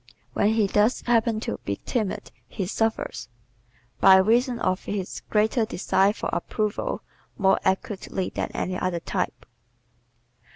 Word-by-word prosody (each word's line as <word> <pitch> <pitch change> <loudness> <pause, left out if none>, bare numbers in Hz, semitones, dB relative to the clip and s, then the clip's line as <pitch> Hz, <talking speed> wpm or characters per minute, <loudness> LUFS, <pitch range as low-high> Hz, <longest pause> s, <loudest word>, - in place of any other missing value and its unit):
When 205 +2 +2
he 220 -2 +3
does 210 +4 +2
happen 230 -2 +2
to 230 - -3
be 100 - -2
timid 215 -6 -2 0.2
he 195 - -4
suffers, 225 - -2 0.7
by 190 - +8
reason 235 +6 +3
of 185 -4 -1
his 195 -3 -4
greater 220 +3 +2
desire 195 -1 +2
for 215 - -4
approval, 215 -1 -2 0.3
more 195 -1 +3
acutely 190 -1 -1
than - - -2
any 185 0 -2
other 180 -2 -1
type. - - -3
210 Hz, 130 wpm, -25 LUFS, 190-225 Hz, 0.7 s, by